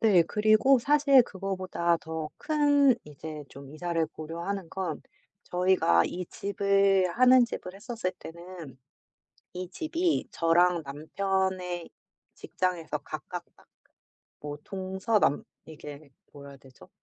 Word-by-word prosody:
네 200 -6 +5
그리고 215 +9 +4
사실 280 0 +5
그거보다 185 -4 -1
더 160 -1 -5
큰 290 -3 +3
이제 150 +1 -8
좀 140 0 -12
이사를 165 0 -1
고려하는 170 +4 -5
건 180 -5 -4 0.4
저희가 180 - +3
이 180 +1 -5
집을 200 -1 +2
하는 255 0 +7
집을 185 -5 -7
했었을 210 -2 -4
때는 170 -5 -10 0.8
이 180 -1 -5
집이 330 - -1
저랑 170 +1 +3
남편의 180 +4 -2 0.5
직장에서 180 -3 -3
가깝다 - - -9 0.8
뭐 145 0 -6
동서남 190 -2 0 0.2
이게 150 -2 -11 0.2
뭐라 140 -1 -11
해야 140 - -12
되죠? 130 -1 -18
185 Hz, 230 characters per minute, -28 LUFS, 160-200 Hz, 0.8 s, 하는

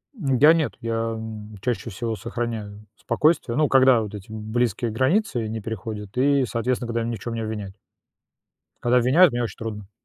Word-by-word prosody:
Я 150 - +5
нет, 160 -3 0
я, 115 0 -2 0.2
м, 110 -1 -8
чаще 120 0 -2
всего 115 +3 -3
сохраняю 110 -3 -5
спокойствие, 130 -1 +1
ну, 155 0 +3
когда 130 -3 +5
вот 105 -2 -6
эти 100 -1 -9
близкие 110 +1 -1
границы 130 - +1
не 110 0 -4
переходят 105 -1 -6
и, 140 0 +3
соответственно, 120 +1 -1
когда 115 0 -1
меня 115 +1 -2
ни - - -2
в - - -17
чём 120 -1 -5
не 115 - -3
обвиняют. 105 -3 -5 1.1
Когда 120 +1 +3
обвиняют, 140 +8 +5
мне 120 0 0
очень 110 - -5
трудно. 105 -3 -6
115 Hz, 180 wpm, -24 LUFS, 110-130 Hz, 1.1 s, Я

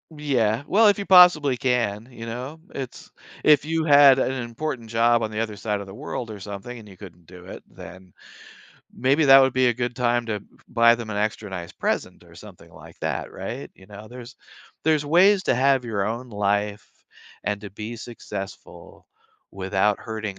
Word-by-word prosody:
Yeah. 130 -5 0
Well, 215 +3 +4
if 205 - +4
you 200 - -4
possibly 175 -8 +6
can. 115 -4 -1
You 115 -2 -9
know? 125 +7 -7
It's 130 -3 -8 0.3
if 150 -1 +5
you 160 +1 -1
had 140 -3 +7
an 130 - 0
important 120 -1 -5
job 115 +1 +2
on 110 -1 -3
the 105 - -4
other 110 -2 -4
side 105 -1 -3
of 100 - -9
the 95 - -10
world 110 +2 -6
or 105 - -9
something 100 +5 -8
and 110 - -14
you 95 - -14
couldn't 90 -2 -14
do 90 +1 -14
it, 95 - -10
then 95 +1 -13 0.8
maybe 135 +5 +1
that 135 -1 +8
would 130 -1 +2
be 130 -1 +3
a - - +2
good 120 0 -3
time 120 -1 0
to 105 -2 -3
b - - -21 0.2
buy 115 0 +5
them 115 -2 -7
an 100 - -4
extra 105 0 -2
nice 90 -3 -7
present - - -3
or - - -18
something - - -14
like - - -15
that, - - -3
right? - - -7
You 95 - -18
know? 105 +1 -12
There's 125 +2 -11 0.5
there's 155 -2 +1
ways 185 +5 +4
to - - +2
have 135 0 +2
your 105 -4 -2
own 120 +3 -4
life 105 -1 -2 0.5
and 105 -1 -1
to 105 - -8
be 110 +4 -7
successful 105 -4 -9 0.4
without 95 +1 0
hurting 110 -3 -6
115 Hz, 195 wpm, -23 LUFS, 105-130 Hz, 0.8 s, that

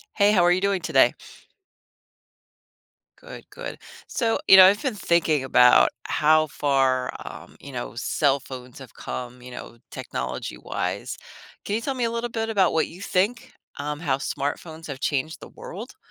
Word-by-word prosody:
Hey, 205 0 +4
how 185 -4 +4
are 175 - +5
you 180 - +2
doing 200 -2 0
today? - - +4 2.1
Good, - - -11
good. - - -8 0.3
So, 230 -3 0
you 190 - +9
know, 185 - +11
I've 200 +3 +4
been 265 -4 0
thinking 165 -7 +1
about 125 -1 +6 0.2
how 155 +1 +3
far, 135 -3 +1
um, - - -10
you 140 - -11
know, 125 -2 -5
cell 140 +3 +1
phones 125 -2 -10
have 130 -4 -12
come, 125 0 -7
you 125 - -11
know, 120 -1 -10
technology-wise. 65 0 -5 0.5
Can 205 - -1
you 225 - -1
tell 270 +3 -3
me 250 - -2
a 230 - 0
little 235 +1 -3
bit 225 -1 -3
about 195 -5 +2
what 160 - +1
you 175 +3 -13
think, 200 +5 -1 0.3
um, 150 +1 -4
how 140 -5 0
smartphones 155 +4 -4
have 140 -3 -7
changed 145 +2 -2
the - - -11
world? - - -9
155 Hz, 170 wpm, -24 LUFS, 130-200 Hz, 2.1 s, know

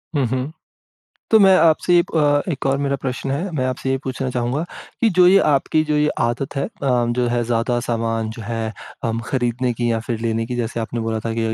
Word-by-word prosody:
हुँ, 140 -3 +2
हुँ, 130 +4 -2 0.8
तो 220 - +7
मैं 195 -1 +7
आपसे 165 +2 +3
ये 175 - +6
प 145 -2 +3
एक 140 - -4
और 135 0 +1
मेरा 140 -1 0
प्रश्न 130 +1 -3
है 165 +8 -2
मैं 130 - 0
आपसे 130 +1 -3
ये 135 - +1
पूछना 130 0 -3
चाहूँगा 125 +5 -1 0.4
कि 230 - +4
जो 180 -1 +7
ये 190 +2 +7
आपकी 145 +2 +2
जो 150 -1 -1
ये 150 0 +3
आदत 125 +4 -1
है 135 - 0
अ, - - -8 0.2
जो 125 -1 +1
है 120 0 0
ज़्यादा 120 +1 0
सामान, 115 -2 -2
जो 115 0 -8
है 115 0 -3 0.3
हम 115 -1 -1
खरीदने 125 -1 0
की 120 +1 -1
या 115 -1 0
फिर 115 0 -4
लेने 115 0 -1
की 125 +1 -4
जैसे 115 -1 -2
आपने 115 +1 -3
बोला 110 -1 -2
था 115 - -4
अभी 115 - -2
125 Hz, 230 wpm, -20 LUFS, 115-140 Hz, 0.8 s, तो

